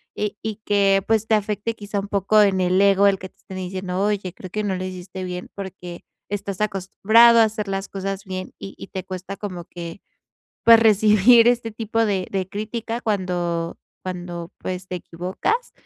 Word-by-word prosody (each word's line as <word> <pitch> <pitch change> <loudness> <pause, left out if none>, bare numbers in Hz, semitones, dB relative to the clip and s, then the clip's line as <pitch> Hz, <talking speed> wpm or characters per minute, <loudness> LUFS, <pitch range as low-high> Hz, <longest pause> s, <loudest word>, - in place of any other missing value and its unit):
eh, 210 -1 -2
y 220 -1 -3
que, 195 -1 +3
pues, 220 -1 +2
te 220 - +4
afecte, 210 +2 -2
quizá, 205 -1 -4
un 195 - -5
poco 200 +2 +3
en 190 -2 +3
el 185 +2 +3
ego, 200 0 +5
el 195 -1 +4
que 185 - -8
te - - -43
estén 190 - -10
diciendo: 185 0 -3
"Oye, 200 -3 -1
creo 185 -1 -10
que 215 +3 -3
no 195 -2 -1
lo 185 - -4
hiciste 185 0 -7
bien". 180 0 -6
Porque 180 -3 -8 0.3
estás 200 -1 -4
acostumbrado 220 +4 +5
a - - +8
hacer 215 -1 -2
las 195 0 -3
cosas 195 0 -4
bien, 185 -1 -6
y 195 - -8
y - - -8
te 190 - -6
cuesta 190 +1 -7
como 180 -5 -6
que, 170 +2 -8 0.6
pues, 230 -1 +8
recibir 215 +2 +6
este 240 -2 +1
tipo 225 +1 -1
de 195 -3 0
de 190 -1 -1
crítica 225 +3 -4
cuando 175 -5 -1 0.3
cuando, 175 -2 -6
pues, 185 0 -5
te 180 - -3
equivocas. 185 - -3
195 Hz, 190 wpm, -22 LUFS, 185-210 Hz, 0.6 s, a